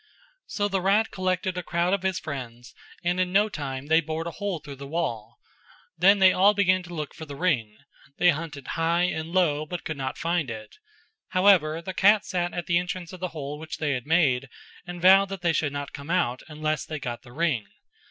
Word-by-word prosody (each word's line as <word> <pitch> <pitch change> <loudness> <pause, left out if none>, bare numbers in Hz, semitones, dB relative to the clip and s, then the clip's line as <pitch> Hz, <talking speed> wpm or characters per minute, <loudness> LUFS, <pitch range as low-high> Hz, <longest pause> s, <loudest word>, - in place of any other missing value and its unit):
So 205 -1 -1
the 195 -2 -1
rat 200 +4 +2
collected 185 -1 -1
a - - -2
crowd 175 +1 0
of 200 - +1
his 190 -1 0
friends 120 -5 -7 0.3
and 175 +1 0
in 180 -1 +1
no 205 +3 +3
time 135 -6 -5
they 160 +2 +4
bored 160 +1 -4
a 170 - -4
hole 200 0 -3
through 145 -2 -10
the 140 +1 -8
wall; 120 -8 -3 0.6
then 190 +5 +5
they 190 -1 +6
all 200 +3 +5
began 185 -2 +3
to 175 -1 -11
look 150 -2 -5
for 160 - -9
the 140 - -7
ring; 125 -11 0 0.4
they 175 - +5
hunted 150 -3 -6
high 165 +1 +1
and 160 -2 -2
low 165 -5 +2
but 175 0 -5
could 155 - -4
not 130 -1 -4
find 165 -4 -1
it; 110 -2 -8 0.5
however 180 -4 +3
the 190 - -5
cat 205 +3 +4
sat 175 -2 -1
at 175 - -4
the 170 -1 +3
entrance 180 0 -5
of 185 - -9
the 185 - -2
hole 150 -3 -6
which 160 0 -7
they 150 -2 -1
had 130 0 -3
made 140 -6 +2 0.4
and 175 -1 -7
vowed 195 +1 +7
that 195 -2 -6
they 170 -1 +3
should 150 -2 0
not 145 0 -5
come 140 +2 -9
out, 130 -9 +1
unless 155 -1 -2
they 155 - -5
got 120 -4 -5
the 120 - -15
ring. 145 -8 0
165 Hz, 220 wpm, -26 LUFS, 145-185 Hz, 0.6 s, vowed